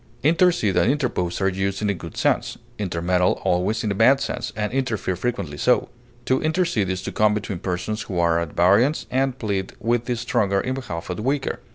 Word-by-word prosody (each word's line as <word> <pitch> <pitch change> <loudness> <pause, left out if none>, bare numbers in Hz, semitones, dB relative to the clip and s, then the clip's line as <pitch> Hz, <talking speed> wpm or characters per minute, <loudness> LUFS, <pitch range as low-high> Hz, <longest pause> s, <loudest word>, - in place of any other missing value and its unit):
Intercede 165 - +3
and 90 +8 +4
interpose 120 - -1
are 95 - +3
used 95 +1 -1
in - - +1
a - - 0
good 85 -4 -9
sense; - - 0 0.2
intermeddle 90 -1 +1
always 90 +5 +1
in 105 - 0
a - - +1
bad 125 +7 +5
sense, 140 - -3
and 105 +1 -2
interfere 120 -8 -1
frequently 95 -8 -3
so. 125 +7 +2 0.4
To 130 - +1
intercede 155 - +1
is 95 0 -3
to - - -4
come 105 0 +3
between 105 -4 -4
persons 95 +5 -3
who 95 - -5
are 85 -1 +3
at 85 -3 -4
variance, 100 - +3
and 130 0 0
plead 100 -5 -2
with 120 0 0
the 125 - -1
stronger 100 -4 0
in 130 - -2
behalf 95 -10 -5
of 90 - -4
the - - -4
weaker. 135 +4 -1
105 Hz, 205 wpm, -23 LUFS, 90-125 Hz, 0.4 s, bad